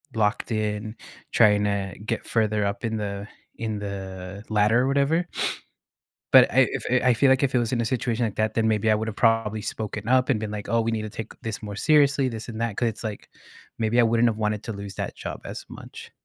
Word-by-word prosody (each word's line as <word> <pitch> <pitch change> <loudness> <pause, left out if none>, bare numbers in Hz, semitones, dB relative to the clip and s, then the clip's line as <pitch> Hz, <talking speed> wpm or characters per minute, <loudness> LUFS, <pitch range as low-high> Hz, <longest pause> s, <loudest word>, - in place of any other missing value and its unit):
locked 110 +2 0
in, 110 0 -2 0.4
tryna 105 -3 +2
get - - -2
further 110 -2 +1
up 100 +4 -3
in 110 -1 -1
the 100 -1 -4 0.3
in 110 -2 -3
the 95 -1 -6
ladder 110 +2 +3
or 130 - +1
whatever. 140 +5 +2 1.1
But - - +8
I - - +6
I - - +2 0.2
f 125 0 +3
I 125 -1 +5
feel 135 +4 +4
like 130 +1 +3
if 135 -2 +1
it - - +5
was 120 0 -1
in 120 - +1
a - - 0
situation 120 0 -1
like 110 - -3
that, 110 0 0
then 115 -1 +2
maybe 110 0 +2
I - - +5
would’ve 110 0 -3
probably 115 -2 +2
spoken 105 0 -5
up 130 0 +3
and 120 -6 +1
been 110 -1 -4
like, 105 -1 -6
"Oh, 115 - +2
we 115 0 0
need 110 -1 -2
to 110 - -5
take 110 -1 -5
this 115 -1 -5
more 105 -2 -6
seriously, 140 0 +3
this 115 -2 -7
and 115 -1 -6
that." 115 -3 -1
'Cause 120 - +1
it's, 110 +1 -7
like, 110 -2 -5 0.5
maybe 115 +2 +2
I - - +5
wouldn't 115 +1 +3
have 110 - -1
wanted 105 0 -1
to 115 - -4
lose 100 -1 -7
that - - -4
job - - -6
as - - -7
much. - - -11
110 Hz, 235 wpm, -25 LUFS, 105-115 Hz, 1.1 s, But